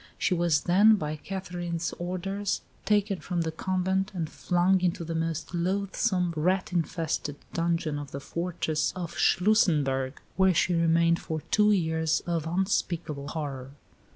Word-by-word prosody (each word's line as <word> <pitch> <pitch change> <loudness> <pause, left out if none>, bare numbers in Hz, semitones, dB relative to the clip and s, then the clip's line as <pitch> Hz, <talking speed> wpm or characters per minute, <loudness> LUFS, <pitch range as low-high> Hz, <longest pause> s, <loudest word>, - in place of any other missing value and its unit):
She 185 - +1
was 170 -3 +2
then, 205 +5 +5
by 155 -5 -3
Catherine's 175 -1 -4
orders, 195 +3 -2 0.2
taken 205 -2 +2
from 175 -3 -2
the 160 -1 -1
convent, 190 +3 0
and 165 -3 -2
flung 180 +3 +1
into 175 -1 0
the 165 0 -4
most 165 +1 -2
loathsome, 185 0 0
rat 180 +4 0
infested 165 -3 -1 0.2
dungeon 165 -3 0
of 145 -1 -7
the 140 - -6
fortress 165 -1 -2
of 170 -2 -5
Schlussenberg, 150 -10 +2 0.2
where 190 -2 +4
she 175 - +2
remained 170 0 +3
for 160 -1 -4
two 210 0 +5
years 160 -4 +1
of 165 -2 -1
unspeakable 170 -5 -1
horror. 140 -4 -5
170 Hz, 140 wpm, -28 LUFS, 160-185 Hz, 0.2 s, then